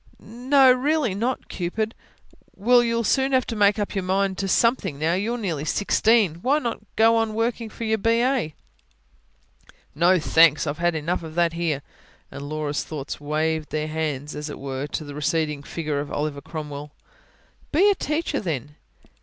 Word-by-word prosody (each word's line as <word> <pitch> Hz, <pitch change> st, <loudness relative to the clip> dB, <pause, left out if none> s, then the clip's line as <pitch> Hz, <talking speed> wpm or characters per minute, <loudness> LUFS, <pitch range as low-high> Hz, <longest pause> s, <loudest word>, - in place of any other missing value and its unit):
"No, 255 Hz, +4 st, +4 dB
really 275 Hz, -3 st, +1 dB
not, 235 Hz, +6 st, -2 dB
Cupid." 215 Hz, +5 st, -3 dB, 0.6 s
"Well, 240 Hz, +4 st, +4 dB
you'll 230 Hz, 0 st, 0 dB
soon 270 Hz, +4 st, +1 dB
have 255 Hz, -1 st, +3 dB
to 230 Hz, -, -4 dB
make 205 Hz, 0 st, +4 dB
up 205 Hz, -1 st, -2 dB
your 195 Hz, -2 st, -2 dB
mind 190 Hz, +1 st, 0 dB
to 195 Hz, -, -1 dB
something 200 Hz, -, +2 dB
now. 160 Hz, +3 st, +1 dB
You're 215 Hz, +6 st, -1 dB
nearly 170 Hz, -10 st, -3 dB
sixteen. 205 Hz, +1 st, +2 dB
Why 275 Hz, +7 st, +3 dB
not 240 Hz, -6 st, -3 dB, 0.2 s
go 225 Hz, +1 st, +5 dB
on 225 Hz, -1 st, 0 dB
working 230 Hz, 0 st, -1 dB
for 230 Hz, -, -8 dB
your 220 Hz, -1 st, 0 dB
B.A.?" 230 Hz, -, +1 dB, 1.4 s
"No 175 Hz, +5 st, +4 dB
thanks! 165 Hz, -2 st, +4 dB
I've 145 Hz, +2 st, -3 dB
had 175 Hz, -1 st, +1 dB
enough 160 Hz, +4 st, -1 dB
of 160 Hz, -1 st, -9 dB
that 170 Hz, -1 st, +2 dB
here." 165 Hz, -5 st, -1 dB, 0.5 s
And 140 Hz, 0 st, -7 dB
Laura's 150 Hz, -1 st, -2 dB
thoughts 145 Hz, -2 st, -6 dB
waved 155 Hz, +1 st, -1 dB
their 155 Hz, 0 st, -2 dB
hands, 150 Hz, -2 st, -3 dB
as 150 Hz, +1 st, -5 dB
it -, -, -7 dB
were, 135 Hz, +1 st, -4 dB
to 155 Hz, -, -4 dB
the 145 Hz, -1 st, -8 dB
receding 150 Hz, 0 st, -1 dB
figure 150 Hz, -1 st, -3 dB
of 145 Hz, 0 st, -5 dB
Oliver 145 Hz, -1 st, -3 dB
Cromwell. 150 Hz, -1 st, -7 dB, 0.8 s
"Be 360 Hz, +7 st, +4 dB
a -, -, +4 dB
teacher, 305 Hz, -3 st, -2 dB
then." 150 Hz, -, -4 dB
175 Hz, 170 wpm, -24 LUFS, 150-230 Hz, 1.4 s, go